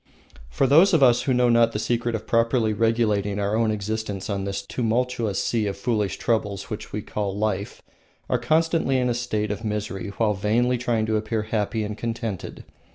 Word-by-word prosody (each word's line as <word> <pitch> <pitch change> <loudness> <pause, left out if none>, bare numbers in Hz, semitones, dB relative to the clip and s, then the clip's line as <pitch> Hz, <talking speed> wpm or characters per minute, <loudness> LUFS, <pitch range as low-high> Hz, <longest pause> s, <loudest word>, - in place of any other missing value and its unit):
Those 165 +8 +5
of 150 - +4
us 120 -2 +5
who 130 - 0
know 125 0 +3
not 115 -1 +4
the - - -1
secret 120 +1 -1
of 110 - -5
properly 115 -1 +2
regulating 105 -2 +1
our 100 +1 0
own 115 0 +2
existence 105 -1 -3
on 100 -1 -2
this 100 0 -3
tumultuous 115 -2 -1
sea 110 -3 0
of 100 -1 -3
foolish 105 -1 -1
troubles 105 -2 -1
which 105 - -6
we 105 0 -4
call 100 -2 -3
life 105 -2 -2 0.4
are 125 - +1
constantly 155 +1 +2
in 125 -1 +1
a - - +1
state 110 -3 -2
of 105 +3 -5
misery 105 -1 -3
while 110 -2 +2
vainly 120 +5 +1
trying 115 -3 0
to 110 0 +1
appear 110 0 -2
happy 110 0 -1
and 105 0 -5
contented. 115 -4 -4
110 Hz, 185 wpm, -24 LUFS, 105-120 Hz, 0.4 s, Those